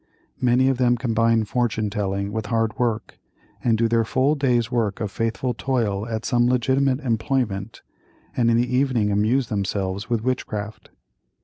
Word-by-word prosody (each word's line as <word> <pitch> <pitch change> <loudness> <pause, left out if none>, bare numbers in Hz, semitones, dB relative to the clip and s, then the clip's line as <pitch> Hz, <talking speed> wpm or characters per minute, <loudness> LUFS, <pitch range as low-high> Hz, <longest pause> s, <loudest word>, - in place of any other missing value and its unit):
Many 125 +1 +3
of 135 -2 +1
them 120 -1 +3
combine 115 -1 +2
fortune 110 -2 -1
telling 100 0 -2
with 110 -1 -3
hard 115 +2 -1
work, 115 -3 -2 0.4
and 115 -2 +2
do 115 +1 +2
their 115 0 +2
full 130 +6 +1
day's 125 -5 +1
work 110 -5 0
of 105 -3 -3
faithful 115 +4 -1
toil 115 -5 -1
at 110 -1 -4
some 120 0 +2
legitimate 130 +2 +1
employment, 115 -4 -2 0.5
and 115 -1 +2
in 115 - +3
the 125 +1 0
evening 125 -6 +1
amuse 110 +5 +1
themselves 100 -1 -2
with 115 -2 0
witchcraft. 110 -4 -4
115 Hz, 155 wpm, -23 LUFS, 105-125 Hz, 0.5 s, Many